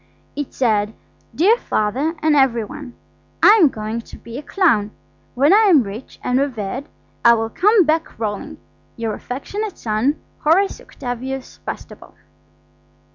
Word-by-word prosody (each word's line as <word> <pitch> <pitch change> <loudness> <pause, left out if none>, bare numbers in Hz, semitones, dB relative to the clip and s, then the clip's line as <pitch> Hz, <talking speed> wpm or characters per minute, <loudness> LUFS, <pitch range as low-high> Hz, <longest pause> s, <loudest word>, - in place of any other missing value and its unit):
It 290 -2 -4
said– 215 -4 0 0.4
"DEAR 410 +9 +4
FATHER 260 +10 -1
AND 310 -1 +4
EVERY 255 -5 +3
ONE,–I 255 - -2
am 310 - +7
going 220 0 -4
to - - -13
be 235 +3 -8
a - - -6
Clown. 290 - +2 0.5
When 285 +7 +4
I 430 +1 +6
am 305 -8 +6
rich 215 +5 -9
and 250 +1 +1
reveared 260 0 -3 0.4
I 235 0 +7
will 225 0 -2
come 415 - +4
back 315 +1 0
rolling. 210 -2 -4 0.4
"Your 225 -2 -2
affectionate 395 - -5
son, 230 +7 0 0.2
"HORACE 370 +6 +2
OCTAVIUS 260 +1 -6
BASTABLE." - - -8
260 Hz, 135 wpm, -20 LUFS, 225-310 Hz, 0.5 s, am